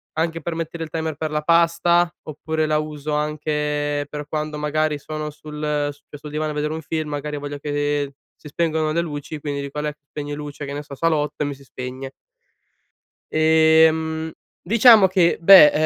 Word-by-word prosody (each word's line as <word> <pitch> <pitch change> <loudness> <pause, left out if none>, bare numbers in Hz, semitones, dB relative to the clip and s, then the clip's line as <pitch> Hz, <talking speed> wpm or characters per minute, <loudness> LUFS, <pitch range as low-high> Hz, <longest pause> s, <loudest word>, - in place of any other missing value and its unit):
anche 165 0 -1
per 170 - -3
mettere 165 0 -4
il 160 - -7
timer 160 -1 -2
per 155 +1 -3
la 150 0 0
pasta, 170 +1 +3 0.2
oppure 155 +1 -2
la 155 0 +2
uso 150 -1 -4
anche 150 -1 -1
per 150 -1 -6
quando 150 0 -3
magari 150 0 0
sono 155 +1 -5
sul 150 -1 -3
su 145 - -19
questo 145 +1 -9
divano 150 +1 -2
a - - -5
vedere 150 +1 -1
un 160 - -5
film, 155 0 -3
magari 145 0 -4
voglio 145 0 -5
che 145 -1 -1 0.2
si - - -13
spengano 160 -1 0
le 170 +2 +1
luci 150 -1 -6
quindi 145 -1 -3
dico: 140 +1 -5
"Alexa 150 -1 -5
spegni 145 -1 -5
luci, 145 0 -7
che 140 - -6
ne 145 - -5
so, 145 - -11
salotto", 150 -2 0
e - - -1
mi 145 - -4
si 140 - -17
spegne. 130 0 -7 1.2
Ehm, 160 0 +4 0.3
diciamo 220 0 +7
che, 185 -2 +3
beh, 170 -3 +9
150 Hz, 180 wpm, -22 LUFS, 145-160 Hz, 1.2 s, beh